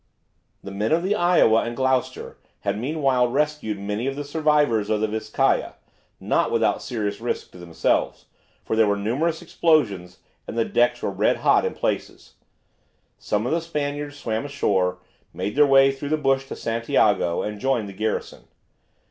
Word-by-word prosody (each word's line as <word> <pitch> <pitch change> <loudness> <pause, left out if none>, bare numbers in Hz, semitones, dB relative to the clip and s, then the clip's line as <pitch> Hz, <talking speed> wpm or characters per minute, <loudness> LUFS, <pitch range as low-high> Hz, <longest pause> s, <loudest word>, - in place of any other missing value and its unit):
The 100 - -7
men 105 +3 -2
of 165 +2 +2
the 195 +3 +1
"Iowa" 175 - +4
and 120 0 -4
"Gloucester" 130 -1 -1 0.2
had - - -1
meanwhile 135 -2 +1
rescued 145 -4 -1
many 105 +5 -3
of 135 - -2
the 145 - -4
survivors 145 -7 +1
of 110 - +1
the 110 - +1
"Vizcaya," 110 0 0 0.4
not - - +1
without - - +1
serious 105 -3 -4
risk 120 - -3
to 90 - -14
themselves, 85 -2 -1 0.4
for - - -1
there 110 -1 +4
were 100 0 +1
numerous 150 - -1
explosions, 105 - +1 0.3
and - - -6
the 115 - +2
decks 120 0 +1
were - - -1
red - - +1
hot - - +4
in - - -3
places. - - -4 0.9
Some 105 +2 -1
of 125 - -1
the 165 +1 +1
Spaniards 145 -2 -4
swam 110 -5 -3
ashore, 95 -11 0 0.4
made 105 - -3
their 145 0 +5
way 135 0 +6
through 135 +1 -6
the 155 - +1
bush 135 -2 +1
to - - -6
Santiago, 110 -6 +1
and 105 0 -5
joined 120 -3 0
the 100 - -9
garrison. 110 +2 -3
120 Hz, 170 wpm, -23 LUFS, 105-145 Hz, 0.9 s, way